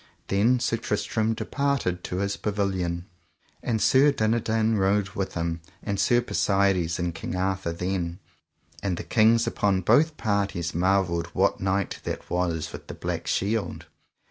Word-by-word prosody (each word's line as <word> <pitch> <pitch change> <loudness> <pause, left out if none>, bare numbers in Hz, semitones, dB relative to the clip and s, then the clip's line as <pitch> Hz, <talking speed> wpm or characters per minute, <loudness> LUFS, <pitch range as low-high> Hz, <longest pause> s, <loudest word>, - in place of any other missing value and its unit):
Then 115 +6 +3
Sir 115 - 0
Tristram 110 +1 -1
departed 140 -13 -1
to - - -4
his 100 +1 -1
pavilion, 95 -4 -2 0.6
and 115 -2 -1
Sir 135 +6 +5
Dinadan 110 -2 +1
rode 95 +1 +2
with 95 0 -4
him; 85 0 -2 0.2
and 100 -2 -2
Sir 120 +5 +4
Persides 95 -7 +1
and 85 -1 -2
King 80 +2 -5
Arthur 95 -1 -1
then, 90 0 -2 0.6
and 95 -4 -1
the - - -5
kings 115 0 +4
upon 95 -2 +1
both 150 - +3
parties, 100 -5 -1
marvelled 90 -1 +1
what - - +1
knight 95 +1 -1
that - - -5
was 85 -3 -1
with - - -9
the - - -7
black - - -4
shield. 100 -3 -1
100 Hz, 145 wpm, -26 LUFS, 90-110 Hz, 0.6 s, Sir